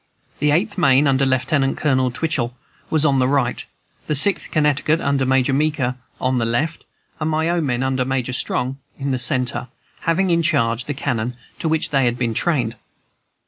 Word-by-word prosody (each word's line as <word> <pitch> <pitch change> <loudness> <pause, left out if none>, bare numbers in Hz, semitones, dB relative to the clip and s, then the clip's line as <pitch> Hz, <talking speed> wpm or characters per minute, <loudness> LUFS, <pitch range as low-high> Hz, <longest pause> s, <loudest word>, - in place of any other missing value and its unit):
The 150 - +2
Eighth 185 +7 +1
Maine, 140 -3 +4
under 135 -1 +2
Lieutenant 135 +1 +1
Colonel 130 -4 +1
Twichell, 125 -3 -2 0.3
was 155 -1 +2
on 140 -2 +3
the 125 - +3
right, 135 -3 0 0.4
the 150 - 0
Sixth 185 +7 +2
Connecticut, 150 +1 +2
under 140 -3 0
Major 130 +1 +2
Meeker, 145 -3 0 0.3
on 130 -1 0
the 115 - 0
left, 150 +8 -1 0.3
and 155 0 -1
my 160 +1 0
own 170 -3 0
men, 125 0 0
under 130 -1 0
Major 130 -1 -2
Strong, 130 +1 -1 0.2
in 140 0 -2
the 130 - -1
centre, 125 0 +1 0.3
having 175 +3 +1
in 170 0 +3
charge 125 -7 +1
the 145 - -4
cannon, 125 -3 -2 0.2
to 160 - -1
which 160 0 0
they 135 -2 +3
had 120 0 0
been 120 -2 -1
trained. 125 -5 0
135 Hz, 185 wpm, -20 LUFS, 125-155 Hz, 0.4 s, Maine